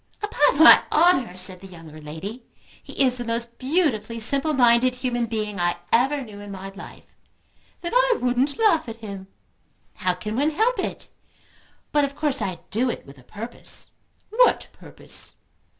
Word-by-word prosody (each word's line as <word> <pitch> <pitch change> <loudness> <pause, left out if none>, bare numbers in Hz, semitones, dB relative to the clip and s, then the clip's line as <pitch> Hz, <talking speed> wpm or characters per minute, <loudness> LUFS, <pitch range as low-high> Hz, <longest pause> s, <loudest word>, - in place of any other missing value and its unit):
"Upon 300 -6 +3
my - - +10
honour," 305 - +3
said 185 0 0
the 195 - -10
younger 165 -4 -12
lady, 165 +11 -8 0.4
"he - - -2
is 255 -1 +2
the 245 - -4
most 235 0 -3
beautifully 255 - 0
simple 275 +7 +2
minded 250 -2 +4
human 245 -2 -2
being 210 -3 -4
I 175 0 +1 0.2
ever 270 +5 +3
knew 210 -4 -11
in 205 0 -10
my 195 0 -7
life." 195 +1 -13 0.7
"Then 345 - -5
I - - +3
wouldn't 250 +3 +1
laugh 400 - +2
at 225 - -6
him." 195 -2 -8 0.7
"How 180 -1 0
can 210 +4 -5
one 285 +5 +2
help 445 +11 0
it? - - -4 0.8
But 295 -1 +3
of 280 0 -2
course 290 -2 0
I 185 -2 -3
do 245 +4 0
it - - -5
with 140 -1 -15
a - - -18
purpose." 220 - -6 0.4
"What - - +3
purpose?" - - -4
240 Hz, 165 wpm, -23 LUFS, 200-285 Hz, 0.8 s, my